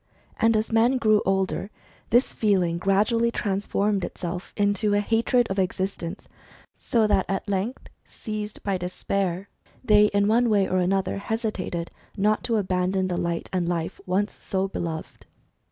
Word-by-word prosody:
And 225 Hz, -1 st, +4 dB
as 215 Hz, +1 st, -2 dB
men 235 Hz, +4 st, +4 dB
grew 215 Hz, -3 st, +3 dB
older, 190 Hz, +1 st, 0 dB, 0.4 s
this 240 Hz, +3 st, +3 dB
feeling 185 Hz, -6 st, +1 dB
gradually 215 Hz, +5 st, +2 dB
transformed 200 Hz, -1 st, -1 dB
itself 175 Hz, +1 st, -5 dB
into 205 Hz, 0 st, +2 dB
a -, -, +3 dB
hatred 230 Hz, +3 st, +2 dB
of 195 Hz, -, -1 dB
existence, 185 Hz, 0 st, -3 dB, 0.5 s
so 230 Hz, -2 st, +1 dB
that 205 Hz, -3 st, +2 dB
at 195 Hz, +2 st, -2 dB
length, 200 Hz, +5 st, -2 dB, 0.2 s
seized 215 Hz, -1 st, -6 dB
by 195 Hz, -2 st, -1 dB
despair, 185 Hz, +1 st, -2 dB, 0.4 s
they 210 Hz, -3 st, +6 dB
in 200 Hz, -1 st, +2 dB
one 235 Hz, +2 st, +3 dB
way 200 Hz, -3 st, +3 dB
or 185 Hz, -, 0 dB
another 190 Hz, +2 st, 0 dB
hesitated 200 Hz, -6 st, -3 dB, 0.3 s
not 210 Hz, +2 st, +2 dB
to 235 Hz, -2 st, +1 dB
abandon 185 Hz, -1 st, 0 dB
the 180 Hz, -, -1 dB
light 170 Hz, -1 st, -2 dB
and 175 Hz, -2 st, 0 dB
life 170 Hz, -2 st, -3 dB
once 200 Hz, +3 st, 0 dB
so 190 Hz, 0 st, -1 dB
beloved. 160 Hz, -, -6 dB
200 Hz, 150 wpm, -25 LUFS, 185-215 Hz, 0.5 s, they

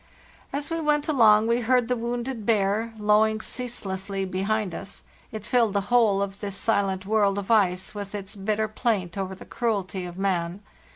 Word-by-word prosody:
" -, -, -27 dB
As 290 Hz, +3 st, -4 dB
we 330 Hz, 0 st, -1 dB
went 300 Hz, -1 st, +1 dB
along 220 Hz, -7 st, +5 dB
we 235 Hz, +1 st, +2 dB
heard 245 Hz, 0 st, +2 dB
the 250 Hz, -, +1 dB
wounded 240 Hz, 0 st, -3 dB
bear 215 Hz, +1 st, +1 dB
low 210 Hz, 0 st, +4 dB
ing 220 Hz, 0 st, 0 dB
ceaselessly 195 Hz, -6 st, -3 dB
behind 195 Hz, +1 st, -1 dB
us; 200 Hz, -, -7 dB, 0.3 s
it 215 Hz, -2 st, -7 dB
filled 235 Hz, -5 st, +2 dB
the 200 Hz, 0 st, -1 dB
whole 210 Hz, -5 st, +4 dB
of 195 Hz, 0 st, -6 dB
this 200 Hz, -2 st, -4 dB
si 225 Hz, -, +1 dB
lent 190 Hz, -1 st, -3 dB
world 205 Hz, -1 st, +2 dB
of 200 Hz, +2 st, -3 dB
ice 185 Hz, -4 st, +2 dB
with 205 Hz, -1 st, -6 dB
its 200 Hz, 0 st, -6 dB
bitter 215 Hz, +2 st, -1 dB
plaint 215 Hz, -5 st, -1 dB
over 190 Hz, -1 st, -3 dB
the -, -, -12 dB
cruelty 195 Hz, -5 st, -2 dB
of 175 Hz, 0 st, -8 dB
man. 185 Hz, -1 st, -1 dB
210 Hz, 190 wpm, -25 LUFS, 195-230 Hz, 0.3 s, along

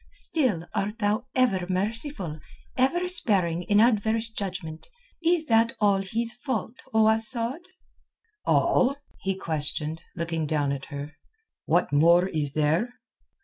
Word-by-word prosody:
"Still 240 Hz, -, +1 dB
art 210 Hz, +3 st, -2 dB
thou 215 Hz, +3 st, -1 dB
ever 195 Hz, -9 st, +2 dB
merciful, 195 Hz, -, -2 dB, 0.4 s
ever 340 Hz, +8 st, +1 dB
sparing 195 Hz, -, +2 dB
in 205 Hz, +3 st, +2 dB
adverse 225 Hz, 0 st, +2 dB
judgment. 180 Hz, -6 st, -5 dB, 0.4 s
Is 335 Hz, -1 st, +2 dB
that 230 Hz, -2 st, +3 dB
all 200 Hz, -2 st, +3 dB
his 225 Hz, +4 st, -1 dB
fault, 245 Hz, -3 st, -4 dB
O 220 Hz, 0 st, +4 dB
Asad?" 230 Hz, +6 st, +2 dB, 0.8 s
"All?" 260 Hz, +2 st, +2 dB, 0.2 s
he 195 Hz, 0 st, -2 dB
questioned, 155 Hz, -1 st, -2 dB
looking 165 Hz, -2 st, -2 dB
down 145 Hz, -2 st, 0 dB
at 140 Hz, -1 st, -4 dB
her. 145 Hz, 0 st, -7 dB, 0.5 s
"What -, -, +1 dB
more 170 Hz, +5 st, +5 dB
is 145 Hz, -4 st, -2 dB
there?" 160 Hz, -, 0 dB
205 Hz, 125 wpm, -26 LUFS, 165-235 Hz, 0.8 s, more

